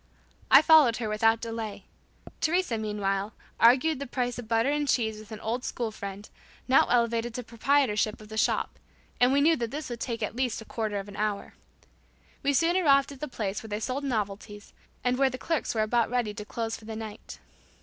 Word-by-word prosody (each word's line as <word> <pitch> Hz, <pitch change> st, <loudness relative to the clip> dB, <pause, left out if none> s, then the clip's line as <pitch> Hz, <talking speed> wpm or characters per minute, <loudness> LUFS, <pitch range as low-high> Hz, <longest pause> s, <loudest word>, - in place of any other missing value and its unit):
I 275 Hz, +3 st, +8 dB
followed 305 Hz, -9 st, +6 dB
her 230 Hz, -, -3 dB
without 225 Hz, +1 st, +2 dB
delay. 225 Hz, -4 st, -5 dB, 0.5 s
Teresa, 345 Hz, -6 st, +1 dB
meanwhile, 205 Hz, -1 st, -2 dB, 0.3 s
argued 260 Hz, +6 st, +5 dB
the 280 Hz, -, -5 dB
price 245 Hz, -1 st, -2 dB
of 235 Hz, -, -8 dB
butter 230 Hz, +4 st, +2 dB
and 295 Hz, 0 st, 0 dB
cheese 220 Hz, -5 st, 0 dB
with 215 Hz, 0 st, -13 dB
an 215 Hz, -, -7 dB
old 240 Hz, +3 st, -2 dB
school 235 Hz, -4 st, -3 dB
friend, 200 Hz, 0 st, -7 dB, 0.4 s
now 260 Hz, -, +5 dB
elevated 235 Hz, -1 st, +1 dB
to 250 Hz, -, -4 dB
proprietorship 230 Hz, -2 st, +1 dB
of 215 Hz, -, -12 dB
the 220 Hz, -, -9 dB
shop, 220 Hz, -, 0 dB, 0.4 s
and 245 Hz, +1 st, +5 dB
we 280 Hz, +1 st, +3 dB
knew 325 Hz, +3 st, +5 dB
that 235 Hz, -2 st, -2 dB
this 295 Hz, 0 st, -6 dB
would 235 Hz, -, -5 dB
take 230 Hz, -2 st, -3 dB
at 215 Hz, -, -3 dB
least 250 Hz, -2 st, -1 dB
a 225 Hz, -, -10 dB
quarter 215 Hz, -3 st, -3 dB
of 200 Hz, 0 st, -5 dB
an 200 Hz, -, -10 dB
hour. 210 Hz, -1 st, -2 dB, 0.9 s
We 280 Hz, -, +1 dB
soon 330 Hz, +5 st, +2 dB
arrived 280 Hz, -6 st, +4 dB
at 275 Hz, -, -12 dB
a 300 Hz, -, -3 dB
place 210 Hz, -6 st, -4 dB
where 220 Hz, -, -10 dB
they 210 Hz, 0 st, -3 dB
sold 255 Hz, +5 st, -3 dB
novelties, 205 Hz, -4 st, -4 dB, 0.3 s
and 250 Hz, +1 st, +1 dB
where 270 Hz, -1 st, +4 dB
the 255 Hz, -, -6 dB
clerks 320 Hz, -4 st, -2 dB
were 215 Hz, -, +2 dB
about 230 Hz, +1 st, +1 dB
ready 240 Hz, -4 st, -1 dB
to 210 Hz, 0 st, -7 dB
close 225 Hz, +1 st, -3 dB
for 220 Hz, -, -13 dB
the 220 Hz, 0 st, -6 dB
night. 220 Hz, -1 st, -8 dB
230 Hz, 210 wpm, -27 LUFS, 215-265 Hz, 0.9 s, I